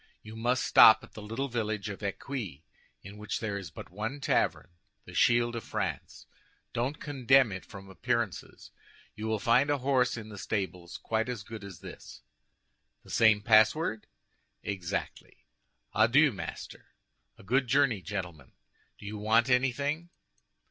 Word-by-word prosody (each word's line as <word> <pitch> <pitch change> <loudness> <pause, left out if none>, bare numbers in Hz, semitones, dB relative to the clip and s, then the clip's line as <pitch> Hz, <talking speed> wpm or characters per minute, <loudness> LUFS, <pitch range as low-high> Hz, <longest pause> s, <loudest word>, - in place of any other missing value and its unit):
You 110 +1 -10
must 120 +3 0
stop 110 0 +8
at - - -15
the 110 - -9
little 115 +7 -3
village 110 -4 -2
of 100 -1 -7
Eccuis, 100 - -5 0.4
in 100 +2 -11
which 105 0 -3
there 110 -3 -3
is 100 -4 -6
but 80 - -11
one 110 +9 -4
tavern—the 85 -9 -3
Shield 120 0 +3
of 115 - -4
France. - - -4 0.5
Don't 125 +5 -2
condemn 135 -4 +3
it 95 -1 -6
from 95 -1 -11
appearances; 95 -3 -3 0.4
you 110 +1 -5
will 110 0 0
find 120 +6 +3
a 145 - +2
horse 130 -2 +1
in 110 -1 -8
the 105 -2 -9
stables 90 -5 -4
quite 110 +1 -2
as 120 -5 -4
good 110 +1 -9
as 95 -5 -10
this." - - -11 0.8
"The - - -13
same 110 -2 +4
password?" 110 +3 +3 0.6
"Exactly." 95 -1 -5 0.5
"Adieu, 130 +8 +5
master!" 95 - -8 0.5
"A - - -15
good 130 +6 +1
journey, 130 -5 +2
gentlemen! 85 -7 -6 0.4
Do - - -13
you 105 +1 -6
want 110 +4 +3
anything?" 140 +6 0
110 Hz, 150 wpm, -29 LUFS, 100-125 Hz, 0.8 s, stop